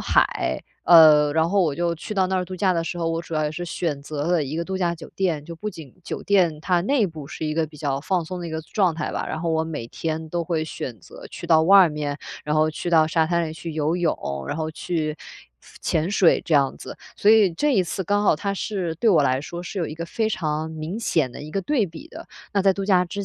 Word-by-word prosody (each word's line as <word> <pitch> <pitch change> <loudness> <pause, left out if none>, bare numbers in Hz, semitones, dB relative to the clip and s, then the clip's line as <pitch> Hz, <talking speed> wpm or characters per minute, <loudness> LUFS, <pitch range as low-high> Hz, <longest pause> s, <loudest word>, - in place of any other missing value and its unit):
海， - - +1 0.2
呃， 155 -3 +7
然 160 +2 +2
后， 195 +1 +3
我 155 - +1
就 170 +1 0
去 170 +6 -7
到 190 -1 +2
那 190 - -2
儿 180 - 0
度 185 +1 -7
假 185 0 +2
的 170 -2 0
时 175 +1 -5
候， 165 -1 0
我 165 0 -2
主 165 - -12
要 155 - +1
也 150 - -2
是 175 +3 -5
选 160 -4 -3
择 145 0 -4
了 175 -3 +2
一 145 +4 -5
个 170 - -2
度 190 +1 -3
假 175 -2 0
酒 165 - -11
店。 170 -6 0
就 170 +2 -8
不 210 +4 -4
仅 155 -8 -12
酒 - - -5
店 175 -6 +2
它 175 +1 +1
内 230 +1 +2
部 155 -4 -8
是 155 - -5
一 155 - -2
个 160 0 +1
比 155 0 -15
较 140 -2 -2
放 175 +2 -1
松 180 +2 -6
的 170 - -5
一 - - -7
个 160 0 -3
状 185 -1 +1
态 155 - -3
吧， - - -2
然 160 - -4
后， 170 - -1
我 160 0 +1
每 150 -8 -5
天 160 +4 -4
都 170 +1 -2
会 160 -2 -1
选 125 -6 -6
择 - - -12
去 170 - -8
到 160 -1 +5
外 190 +1 +7
面， 150 -1 -4 0.3
然 150 +1 0
后， 155 0 +3
去 170 +2 -4
到 160 -2 +5
沙 160 0 +2
滩 170 -1 0
里 155 - -6
去 165 +1 -7
游 155 +1 0
泳， 175 -3 0 0.3
然 - - -2
后， 155 -1 -2
去 155 -1 -3 0.5
次 - - -17
潜 160 +3 0
水 195 -4 +4
这 165 - 0
样 140 -2 +3
子。 - - -9 0.2
所 210 - +4
以 210 -5 +5
这 290 - +1
一 190 - +4
次 185 +2 -3
刚 205 +4 +1
好 - - +5
它 200 +4 -2
是， 190 -5 -3
对 225 - +2
我 165 -6 +5
来 130 -1 +1
说 170 +4 -7
是 195 - -6
有 170 - -1
一 150 - -6
个 170 +1 -6
非 220 +4 -1
常 160 -5 -2
明 160 +6 -5
显 155 - +1
的 - - -9
一 150 - -8
个 195 - -1
对 250 -7 +1
比 165 -1 -11
的。 - - -10 0.3
那 200 - +3
在 195 - +5
度 195 +1 -4
假 185 -3 +3
之 200 +3 -5
165 Hz, 295 characters per minute, -23 LUFS, 155-185 Hz, 0.5 s, 呃